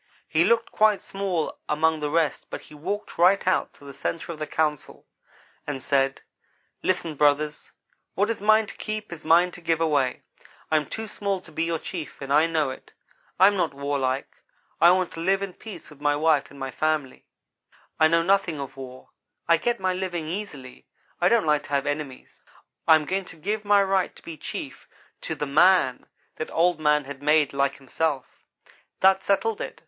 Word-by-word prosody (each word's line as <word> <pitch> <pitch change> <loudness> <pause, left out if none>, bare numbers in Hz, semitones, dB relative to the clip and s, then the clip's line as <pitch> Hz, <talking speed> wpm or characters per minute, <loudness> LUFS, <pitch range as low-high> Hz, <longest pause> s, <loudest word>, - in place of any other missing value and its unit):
He 165 +2 +3
looked 235 -1 +2
quite 215 -2 +3
small 195 -5 -3
among 160 +1 +2
the 150 -1 -2
rest 160 0 0
but - - -6
he - - -16
walked 200 +8 -5
right 185 +3 +5
out 185 - +1
to 140 - -17
the 140 - -9
centre 165 +4 -4
of 160 - -8
the 155 - -3
council 150 -2 -2 0.6
and 145 -2 -3
said: 135 0 0 0.6
"'Listen, 175 -3 -1
brothers 150 +1 +1 0.4
what 205 +2 +2
is 230 -3 -3
mine 215 +1 +5
to - - -10
keep 215 -3 -5
is 165 - -10
mine 170 +3 +4
to 175 - -12
give 165 -1 0
away. 145 -5 +1 0.5
I 155 - +5
am 150 - -1
too 220 0 -5
small 200 -2 -2
to 165 - -15
be 165 +2 -1
your 165 0 -1
chief 155 - -7
and 140 0 -3
I 155 +3 +5
know 155 -5 0
it. - - -12 0.5
I 190 - +8
am 205 +1 +5
not 165 -7 -1
warlike. 140 -2 -2 0.4
I 170 - +8
want 185 0 +2
to - - -9
live 195 +3 +1
in 195 -2 -5
peace 215 -5 -11
with 145 -1 -16
my 145 0 +2
wife 150 -1 +2
and 135 -2 -7
family. 155 -4 -2 0.7
I 160 - +7
know 165 +1 +3
nothing 185 -4 +1
of 135 -1 -6
war. 130 -1 -10 0.4
I 170 0 +5
get 240 +7 -1
my 185 -1 0
living 180 -4 -3
easily. 155 -9 -7 0.3
I 175 - +5
don't 235 -3 +3
like 150 -1 +3
to - - -13
have 140 - 0
enemies. 145 -2 -5 0.5
I 160 - +9
am 155 -1 +1
going 190 +4 -2
to 165 - -11
give 210 +6 -3
my 205 -1 +4
right 195 -1 0
to - - -16
be 165 - -7
chief - - -7 0.3
to - - -4
the 150 - -3
man 145 -2 +3 0.3
that 155 - -4
Old 170 0 +2
man 150 -1 +2
has 140 0 -9
made 150 -1 +3
like 140 0 0
himself.' 140 +1 -3 0.6
"That 190 0 +5
settled 205 +2 0
it. - - -6
160 Hz, 195 wpm, -25 LUFS, 145-190 Hz, 0.7 s, I